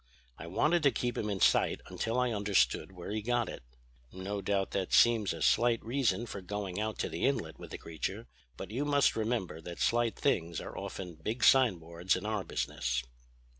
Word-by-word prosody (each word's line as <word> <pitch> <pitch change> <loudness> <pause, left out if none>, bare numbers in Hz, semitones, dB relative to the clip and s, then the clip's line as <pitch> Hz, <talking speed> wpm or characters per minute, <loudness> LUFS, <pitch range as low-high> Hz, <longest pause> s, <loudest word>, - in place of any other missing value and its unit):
I - - -7
wanted 155 - +2
to 140 -2 +4
keep 120 -1 -2
him 105 - -2
in 100 -2 -2
sight - - +3
until 115 +2 -2
I 125 -1 +1
understood 100 -2 +1
where 90 +1 -8
he 110 0 -2
got 120 +1 0
it. - - -7 0.5
No 100 +2 -4
doubt 95 0 0
that 95 -2 -2
seems 115 -5 +5
a 80 -3 -4
slight 120 +5 +4
reason 120 -3 +1
for 100 -4 -7
going 100 0 -4
out 110 -1 -2
to - - -1
the - - -5
Inlet - - 0
with - - -9
the - - -6
creature; 95 +7 -5 0.3
but 95 - -7
you 130 +6 -1
must 145 -2 +3
remember 110 -7 -2
that 85 +1 -8
slight 120 -1 +1
things 85 - 0
are - - -8
often 90 -2 -6
big 115 +8 -3
signboards 90 -8 +3
in - - -5
our 105 -2 -1
business." 60 -7 -2
105 Hz, 195 wpm, -31 LUFS, 95-120 Hz, 0.5 s, seems